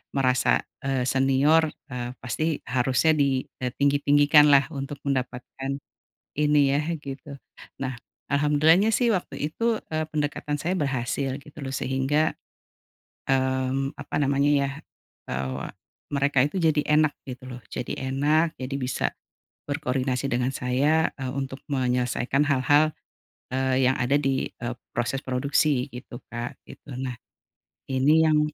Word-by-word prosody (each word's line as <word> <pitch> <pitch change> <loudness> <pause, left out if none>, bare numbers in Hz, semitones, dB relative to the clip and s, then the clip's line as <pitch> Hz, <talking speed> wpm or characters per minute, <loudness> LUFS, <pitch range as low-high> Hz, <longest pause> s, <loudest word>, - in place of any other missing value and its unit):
merasa, 130 -2 +2 0.2
eee, 130 -2 +1
senior, 135 +5 +3 0.2
eee, 125 0 -4
pasti 155 +5 -1
harusnya 130 +5 +2
di, 140 -4 +2 0.2
eee, 125 -1 -3
tinggi-tinggikanlah 145 +1 +5
untuk 140 0 -6
mendapatkan 130 0 -3 0.6
ini 145 -2 +3
ya 145 - +2 0.2
gitu. 140 0 -8 0.4
Nah, 130 -1 -3 0.4
alhamdulillahnya 150 +7 +4
sih 230 +1 +3
waktu 185 - -3 0.2
itu, 230 +2 +1 0.2
eee, 155 0 -1
pendekatan 150 -1 -2
saya 170 +5 -1
berhasil 135 -3 -1
gitu 145 +1 -16
loh 135 -1 -4
sehingga, 135 +4 +1 1.0
mmm, 130 +1 +1
apa - - -5
namanya 140 0 +2
ya? 140 -1 +1 0.6
Eee, 65 0 -3 0.4
mereka 140 -1 +2
itu 190 - -8
jadi 160 -4 +3 0.2
enak 155 -1 +4 0.2
gitu 130 0 -7
loh, 125 0 -8
jadi 125 - -4 0.2
enak, 155 +4 +2
jadi 130 +1 -6
bisa 125 0 0 0.6
berkoordinasi 130 -2 -1
dengan 125 +2 +1
saya, 135 +5 +1
eee, 130 -2 -4
untuk 135 0 -4
menyelesaikan 125 +1 +1
hal-hal, 145 +3 +4 0.6
eee, 130 0 +1
yang 130 - +2
ada 125 +4 +2
di, 135 -2 0
eee, 120 0 -6 0.2
proses 120 +3 0
produksi 140 +1 +1
gitu 125 0 -9
Kak, 120 +1 -5
gitu, 145 - -11
nah 125 -2 -4 0.8
ini 150 +5 +4
yang 155 -1 +4
135 Hz, 130 wpm, -25 LUFS, 130-150 Hz, 1.0 s, tinggi-tinggikanlah